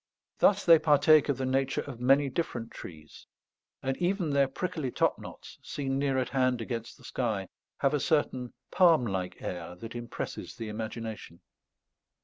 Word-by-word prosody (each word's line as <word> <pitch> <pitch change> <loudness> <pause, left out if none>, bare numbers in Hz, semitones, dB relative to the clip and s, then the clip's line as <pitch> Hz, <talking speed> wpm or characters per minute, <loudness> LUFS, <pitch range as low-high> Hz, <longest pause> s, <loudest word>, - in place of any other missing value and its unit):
Thus 205 0 +4
they 165 -2 +8
partake 155 0 +5
of 140 - +1
the 135 - -2
nature 135 +1 0
of 130 -5 -8
many 135 +3 +4
different 125 -5 -3
trees; 75 -3 -11 0.6
and 135 0 0
even 180 -3 0
their 140 -1 +3
prickly 155 0 -3
top - - +1
knots, - - -11
seen 135 -1 -3
near 140 -1 +1
at 130 - 0
hand 130 -1 +1
against 115 0 -5
the - - -19
sky, 110 -7 -2 0.3
have 140 - +3
a 150 - +2
certain 130 -4 0 0.2
palm 165 -8 +5
like 95 -4 -4
air 90 -1 -5
that 110 +5 -9
impresses 120 -1 -6
the 115 -2 -6
imagination. 110 -4 -6
130 Hz, 160 wpm, -29 LUFS, 115-145 Hz, 0.6 s, they